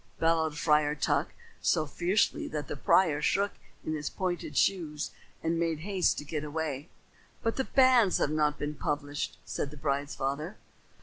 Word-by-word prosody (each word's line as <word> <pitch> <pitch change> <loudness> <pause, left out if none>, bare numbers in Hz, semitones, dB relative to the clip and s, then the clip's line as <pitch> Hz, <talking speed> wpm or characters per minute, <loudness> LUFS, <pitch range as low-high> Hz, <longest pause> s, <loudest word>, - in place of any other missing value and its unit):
bellowed 160 -2 +2
Friar 150 -2 +3
Tuck, 145 - 0 0.3
so 155 - +2
fiercely 175 +7 +1
that 150 -2 -4
the - - -4
prior 150 +1 +3
shook 200 +6 +2 0.3
in 155 - -1
his 150 -2 -2
pointed 180 -2 -3
shoes 160 -6 +1 0.3
and 165 0 0
made 165 -2 0
haste 190 0 +1
to 150 - -5
get 150 0 -3
away. 150 -1 -3 0.5
"But 225 -1 0
the 265 - 0
banns 255 -7 +5
have 145 - +1
not 150 -1 +1
been 145 0 -3
published," 145 -1 -3
said 140 - -3
the 150 - -11
bride's 140 0 -1
father. 145 +8 -3
155 Hz, 165 wpm, -30 LUFS, 150-175 Hz, 0.5 s, banns